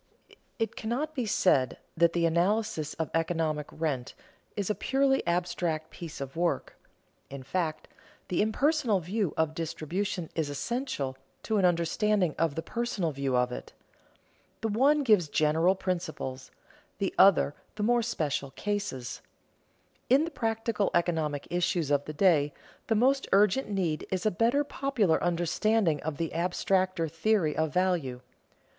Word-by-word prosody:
It 225 -2 -2
cannot 260 +8 -2
be 250 -6 -2
said 140 -10 +2 0.2
that 170 0 +3
the 170 -1 +2
analysis 170 -1 0
of 160 - -3
economic 165 -2 0
rent 145 -6 -3 0.4
is 200 -2 -1
a 210 - +1
purely 270 +3 +1
abstract 170 -2 -1
piece 165 -2 -8
of 135 -1 -6
work. 170 +1 -1 0.5
In 135 -1 -8
fact, 155 +2 -2 0.4
the 180 - +1
impersonal 240 0 +2
view 190 +1 -2
of 160 -1 +1
distribution 170 +3 -3
is 160 -3 -1
essential 145 - -3 0.3
to 220 - 0
an 190 - +3
understanding 180 +1 +2
of 165 -4 +1
the 165 - -3
personal 220 -6 -2
view 135 -2 -1
of 125 0 +1
it. - - -7 0.9
The 225 - -1
one 280 +7 +3
gives 210 - +4
general 160 +5 +3
principles, 155 -9 -4 0.5
the 195 -1 -1
other 190 -6 +6 0.2
the 235 +3 +2
special 150 - -2
cases. 200 -7 -4 0.9
In 275 +5 +5
the 335 - -6
practical 225 -4 -1
economic 160 -4 0
issues 175 -3 0
of 145 0 +2
the 155 - -6
day, 150 -4 +3 0.3
the 225 - +2
most 265 +5 +2
urgent 205 +5 +3
need 180 -6 -1
is 185 +1 -2
a 215 - +3
better 235 +10 +2
popular 260 - 0
understanding 175 +1 +1
of 155 -2 -4
the 165 0 -2
abstracter 185 0 0
theory 165 0 +1
of 160 -1 0
value. 170 -8 0
175 Hz, 140 wpm, -29 LUFS, 155-215 Hz, 0.9 s, other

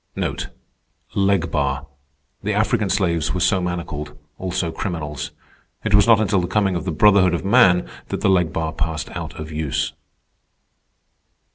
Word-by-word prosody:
Leg 95 -4 +1
bar—the 70 +5 -4
African 105 -1 +1
slaves 85 -4 0
were - - -1
so 95 +2 +2
manacled; 80 -4 -4 0.2
also 90 -2 -2
criminals. 75 -6 -4 0.5
It 110 - -1
was 105 +2 +6
not 115 -2 +6
until 100 -3 +2
the 90 - -2
coming 95 0 +1
of 85 - -3
the 90 - -1
Brotherhood 95 +1 +5
of 85 - -4
Man 90 -2 +5 0.2
that - - -4
the - - +2
leg 90 -4 +2
bar 80 0 -2
passed 80 -1 -3
out - - -6
of 75 +1 -6
use. 75 -3 -2
90 Hz, 145 wpm, -21 LUFS, 75-95 Hz, 0.5 s, was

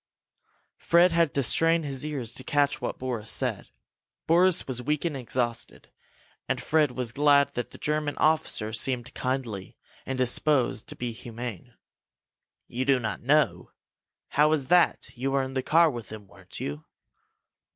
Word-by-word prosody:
Fred 170 +1 +4
had 165 -3 +2
to 140 - +2
strain 165 +6 +3
his 135 -2 -3
ears 140 -7 -4
to 130 - -8
catch 145 0 +1
what - - -3
Boris 120 -4 -4
said. - - 0 0.6
Boris 180 +2 +3
was 125 -2 -2
weak 150 +5 -1
and 165 -4 -1
exhausted, 120 -2 -4 0.6
and - - 0
Fred 150 -4 +1
was 125 -3 -3
glad 140 +1 +3
that 120 - -4
the - - -13
German 150 -1 -2
officer 145 -8 +1
seemed 125 +2 0
kindly 125 -7 -4 0.3
and 130 - -4
disposed 130 -1 +1
to - - -9
be 120 -1 -4
humane. 115 -3 -8 0.9
"You 125 +2 -3
do 135 -1 +3
not 110 -4 -4
know? 120 - +1 0.6
How 150 +1 +3
is 145 -3 -2
that? 180 0 +3
You 130 +1 -3
were 135 0 +1
in 130 0 -6
the 130 - -1
car 165 +4 +4
with 120 -5 -8
them, 105 -1 -9
weren't - - -11
you?" 75 +2 -5
130 Hz, 160 wpm, -26 LUFS, 120-150 Hz, 0.9 s, Fred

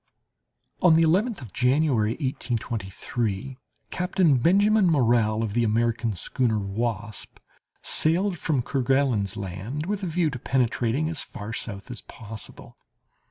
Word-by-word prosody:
On 175 -3 +6
the 165 - +5
11th 195 +6 +2
of 110 -7 -10
January, 125 -4 +2
1823, 120 - -3 0.3
Captain 180 -5 +2
Benjamin 200 - +4
Morrell, 115 -7 +3
of 105 -3 -3
the 120 +1 +2
American 115 0 +1
schooner 115 +5 0
Wasp, 105 +1 -4 0.5
sailed 175 +3 +2
from 140 -6 0
Kerguelen's 130 -7 +1
Land 100 - -5
with 205 +2 -2
a 190 - -2
view 165 -2 +1
of 125 - -7
penetrating 125 +2 +1
as 160 -3 -3
far 105 +2 -7
south 110 0 -5
as 120 - -6
possible. 110 -2 -10
125 Hz, 125 wpm, -25 LUFS, 110-160 Hz, 0.5 s, On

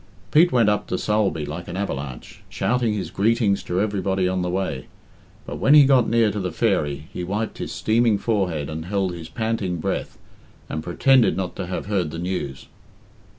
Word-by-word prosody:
Pete 170 +3 +5
went 120 -4 +3
up 105 0 +1
to 90 - -1
Sulby 100 -8 0
like 85 +4 -6
an 85 - -5
avalanche, 70 -10 -5
shouting 120 -3 0
his 100 - -4
greetings 105 -1 +2
to 90 - -2
everybody 95 -3 0
on 95 0 0
the 90 - -1
way. 90 -8 -3 0.6
But - - -6
when 145 - +5
he 145 -2 +9
got 130 -4 +4
near 115 -2 +3
to 105 - -3
the 90 -2 -2
"Fairy," 80 -8 0
he 90 - -4
wiped 105 +5 -3
his - - -4
steaming 115 -1 +2
forehead 95 -10 -1
and 80 +1 -5
held 95 -1 -1
his 85 -2 -8
panting 110 -6 -2
breath, 80 - -3 0.5
and 80 - -4
pretended 125 - +3
not 95 -2 -3
to 90 - -4
have 90 - -4
heard 95 -6 0
the 80 - -7
news. 85 -6 -4
95 Hz, 190 wpm, -23 LUFS, 85-110 Hz, 0.6 s, he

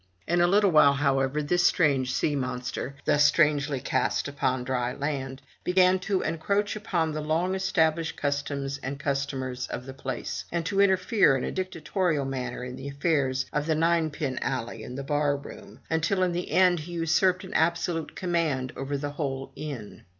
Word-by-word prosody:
In 175 0 +2
a 175 - +5
little 200 +1 +4
while, 145 -3 +6
however, 140 +1 +1
this 175 +4 +2
strange 140 -8 +3
sea 145 +3 0
monster, 125 0 -3
thus 145 -1 +4
strangely 145 -2 +3
cast - - 0
upon 135 -3 -1
dry 125 -1 -1
land, 135 -2 -4 0.2
began 185 +1 +4
to 190 0 -1
encroach 200 +7 0
upon 170 -6 -1
the 155 0 -3
long 165 +5 0
established 165 -4 +1
customs 140 -1 -2
and 140 +2 -5
customers 135 -2 -2
of 125 - -6
the 135 - -7
place 135 0 -4
and 170 -1 -1
to 195 +3 +2
interfere 190 - +4
in 125 - -4
a - - -2
dictatorial 180 -4 -1
manner 125 -2 -4
in 125 0 -6
the 135 - -7
affairs 140 -3 0
of 150 +1 -1
the 160 - +2
ninepin 160 -4 0
alley 115 -1 -3
and 125 +3 -7
the 140 - -4
bar 145 0 +1
room, 140 - -12
until 165 +4 +1
in 180 - +2
the 175 +1 -3
end 180 -2 +4
he 170 +3 -8
usurped 175 +3 +2
an 190 +1 -8
absolute 165 0 0
command 160 -8 -1
over 140 +1 -3
the 145 +1 -4
whole 135 -3 -4
inn. 135 -9 -7
150 Hz, 175 wpm, -27 LUFS, 135-175 Hz, 0.2 s, while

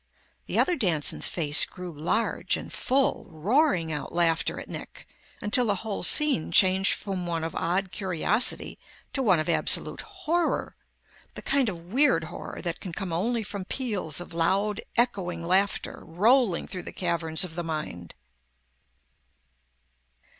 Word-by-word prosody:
The - - -2
other 360 - +3
Danson's 170 - +1
face 155 0 +3
grew 180 -1 -6
large 165 +9 -1
and - - -8
full, 270 +1 +1
roaring 180 - +1
out 150 -2 -4
laughter 165 -1 +1
at - - -9
Nick - - -8 0.4
until 230 +4 +2
the 205 - +2
whole 210 -2 -2
scene 290 - +3
changed 190 +2 +4
from 190 -3 -5
one 165 -1 -2
of 165 - -3
odd 180 +3 -1
curiosity 190 +4 0 0.3
to 270 - 0
one 195 -8 +4
of 155 - -2
absolute 170 - +3
horror, 365 -5 -2 0.6
the - - -8
kind 275 -4 +2
of 175 0 -9
weird 260 - +4
horror - - -8
that 170 -2 -3
can 180 - -7
come 180 0 -4
only 225 +7 0
from 200 -2 -6
peals 205 - -3
of 175 - -9
loud, 195 +5 +1 0.2
echoing 185 -8 0
laughter 190 +3 0
rolling 205 +3 +2
through 180 - -6
the - - -8
caverns 170 -1 0
of 180 -3 -4
the 175 +1 -4
mind. 150 - -5
185 Hz, 145 wpm, -26 LUFS, 165-225 Hz, 0.6 s, changed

